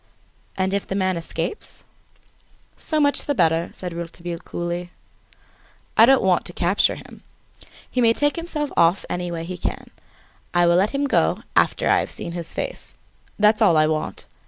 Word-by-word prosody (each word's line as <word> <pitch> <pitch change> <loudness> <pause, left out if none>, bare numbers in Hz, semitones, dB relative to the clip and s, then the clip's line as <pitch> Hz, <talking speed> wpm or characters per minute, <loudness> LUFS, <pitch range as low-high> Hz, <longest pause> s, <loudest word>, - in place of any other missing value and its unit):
"And 190 0 0
if 200 - -1
the 195 - -3
man 190 -1 +1
escapes?" 170 - -5 0.9
"So 310 - -1
much 285 -1 +2
the 285 - 0
better," 165 -4 +2
said 180 -2 -5
Rouletabille, 170 0 -6
coolly, 175 +1 -4 1.1
"I 225 - +7
don't 270 0 +5
want 185 -2 +3
to 175 - -4
capture 175 +4 +2
him. - - -13 0.7
He 250 - -1
may 230 -1 +5
take 290 +4 +1
himself 330 -4 -3
off 170 +3 +3
any 175 0 -2
way 165 -1 -4
he 180 +2 -6
can. - - -4 0.6
I 175 0 +5
will 170 0 +4
let 200 +8 +1
him 280 +1 +1
go 280 - +1
after - - +2
I - - +4
have - - -3
seen 170 - -7
his 170 -1 -4
face. - - -5 0.4
That's 215 +1 +4
all 180 -7 +5
I 155 - +5
want. 155 0 -3
185 Hz, 175 wpm, -22 LUFS, 170-235 Hz, 1.1 s, I